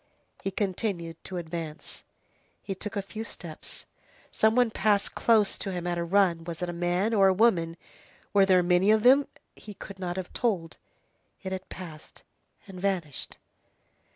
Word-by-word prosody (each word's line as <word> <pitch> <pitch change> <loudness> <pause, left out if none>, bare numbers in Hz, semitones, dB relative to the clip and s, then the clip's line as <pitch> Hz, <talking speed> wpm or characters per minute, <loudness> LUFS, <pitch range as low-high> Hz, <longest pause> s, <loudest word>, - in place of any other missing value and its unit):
He - - -1
continued 185 -4 -3
to 185 - -4
advance. 165 -2 -5 0.6
He 195 - -3
took 210 +2 -6
a 200 - -1
few 215 +3 -6
steps. 170 -7 -8 0.5
Some 220 +1 +3
one 245 -2 +4
passed 205 -1 +1
close 220 -3 +3
to 195 - -3
him 175 -1 -4
at 175 -1 -1
a - - 0
run. 175 -2 +3
Was 170 +1 -5
it 175 - -2
a - - -3
man? 175 +5 0
Or 195 -3 +6
a 190 - +5
woman? 175 -6 +3 0.6
Were 195 -1 +5
there 185 -2 +5
many 180 +3 +3
of 215 0 +5
them? 270 +3 +6 0.3
he 210 -1 -11
could 195 0 -10
not 180 -1 -3
have 185 -2 -5
told. 185 -9 -1 0.7
It 190 - -4
had 190 0 -5
passed 160 -4 -10 0.4
and 185 -2 -9
vanished. 180 -8 -2
190 Hz, 170 wpm, -28 LUFS, 175-205 Hz, 0.7 s, Or